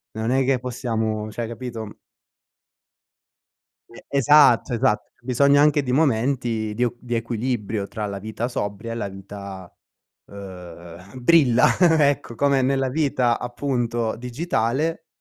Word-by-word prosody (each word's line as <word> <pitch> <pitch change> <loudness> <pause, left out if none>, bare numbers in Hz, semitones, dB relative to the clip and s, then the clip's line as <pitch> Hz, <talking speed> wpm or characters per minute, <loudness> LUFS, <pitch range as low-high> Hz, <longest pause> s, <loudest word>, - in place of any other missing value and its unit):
non 110 +2 -2
è 135 0 +2
che 130 -2 +2
possiamo 110 -4 -3
cioè 115 +1 -4
capito? 115 -2 -7 1.9
E 115 - -14
esatto, 140 -3 +4
esatto, 105 -2 +1 0.2
Bisogna 140 +3 +3
anche 150 -1 +3
di 125 -2 -2
momenti 120 -5 0
di 120 +3 +1
o 120 - -1
di 120 -1 -4
equilibrio 115 -3 -2
tra 105 -2 -4
la 100 -1 -5
vita 110 +4 -4
sobria 105 0 -4
e - - -3
la 110 -3 -3
vita, 95 -1 -10 0.5
uhm, 90 +1 -11
brilla, 130 -5 +5 0.4
ecco, 140 -4 -3
come 140 +1 +2
nella 135 0 +1
vita 130 -4 +1
appunto 120 -2 -2
digitale 135 +4 -2
120 Hz, 125 wpm, -23 LUFS, 110-130 Hz, 1.9 s, brilla